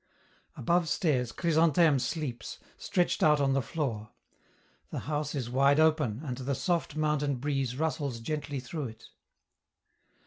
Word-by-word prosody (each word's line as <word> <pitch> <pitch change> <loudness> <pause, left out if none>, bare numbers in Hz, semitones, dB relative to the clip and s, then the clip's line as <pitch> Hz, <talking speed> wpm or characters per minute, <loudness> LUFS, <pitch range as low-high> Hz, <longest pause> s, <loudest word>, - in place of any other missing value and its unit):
Above 170 +5 +1
stairs, 130 -6 +1
Chrysantheme 160 -2 +3
sleeps, 125 -2 -4 0.2
stretched 175 -1 0
out 150 -1 +5
on 135 -1 +2
the 135 - +2
floor; 115 -6 -3 0.8
the - - -4
house 150 0 -2
is 130 -4 -2
wide 140 +4 +3
open, 155 -6 +2
and 125 -3 -4
the 135 +1 -2
soft 170 -2 -1
mountain 150 -2 +1
breeze 135 -1 -2
rustles 145 -5 -2
gently 145 +2 -3
through 140 +2 -5
it. 110 0 -13
145 Hz, 135 wpm, -29 LUFS, 125-155 Hz, 0.8 s, out